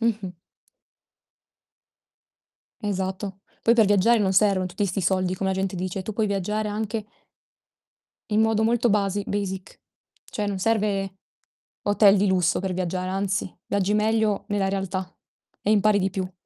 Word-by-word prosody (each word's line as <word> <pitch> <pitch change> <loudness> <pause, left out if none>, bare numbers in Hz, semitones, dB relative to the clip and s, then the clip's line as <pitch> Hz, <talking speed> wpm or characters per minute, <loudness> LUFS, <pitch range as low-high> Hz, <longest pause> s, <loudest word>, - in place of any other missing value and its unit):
Mh-mh. 215 -5 -1 2.5
Esatto. 190 -1 -3 0.2
Poi 230 - +5
per 225 -3 +5
viaggiare 205 +4 +4
non 195 -2 +1
servono 195 -1 +3
tutti 185 +3 -2
'sti 195 +1 -1
soldi 185 0 +1
come 190 +1 -1
la 190 - 0
gente 190 -1 -2
dice, 185 +1 -3
tu 215 - -5
puoi 215 +1 0
viaggiare 210 +2 -1
anche 215 +1 -3 1.3
in 210 +1 +3
modo 220 0 +2
molto 240 +1 +2
basi 200 -1 +1
basic. 190 -2 -4 0.4
Cioè 210 -1 -4
non 200 -2 -2
serve 200 -2 0 0.7
hotel 205 0 +5
di 200 +1 +2
lusso 180 -3 +2
per 190 0 -2
viaggiare, 185 0 -2
anzi 190 -1 -1
viaggi 200 0 0
meglio 215 -1 +1
nella 200 -2 0
realtà 190 -1 -3 0.5
e 205 - -1
impari 210 0 +4
di 190 0 0
più. 190 -1 -4
200 Hz, 145 wpm, -24 LUFS, 190-210 Hz, 2.5 s, Poi